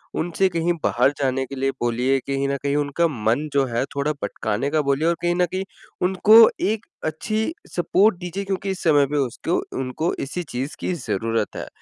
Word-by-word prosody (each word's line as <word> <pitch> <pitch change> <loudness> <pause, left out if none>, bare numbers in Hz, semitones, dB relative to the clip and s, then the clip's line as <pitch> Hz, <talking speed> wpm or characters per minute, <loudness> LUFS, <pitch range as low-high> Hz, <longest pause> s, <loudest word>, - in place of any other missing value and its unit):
उनसे 175 +4 +1
कहीं 170 0 0
बाहर 125 +4 +3
जाने 135 -1 0
के 135 - -8
लिए 135 0 0
बोलिए 120 +3 +1
कहीं 140 0 0
न 140 - 0
कहीं 140 0 0
उनका 145 +3 +1
मन 120 +1 0
जो 140 -1 +3
है 120 0 -1
थोड़ा 140 +2 0
भटकाने 105 +5 -2
का 155 0 +2
बोलिए 140 +3 +1
और 170 - +3
कहीं 175 0 +1
न 180 0 +3
कहीं 190 +1 -2 0.4
उनको 190 +4 +6 0.2
एक 215 +1 0 0.2
अच्छी 215 - -2 0.2
सपोर्ट 190 +4 +3
दीजिए 180 +3 -4
क्योंकि 195 0 -2
इस 190 - -5
समय 145 -4 +5
पे 145 +2 -2
उसको 140 +5 -1 0.2
उनको 130 +6 -2
इसी 145 +6 -4
चीज़ 135 -1 -5
की - - -2
ज़रूरत 115 - -2
है। - - -5
145 Hz, 195 wpm, -22 LUFS, 130-175 Hz, 0.4 s, उनको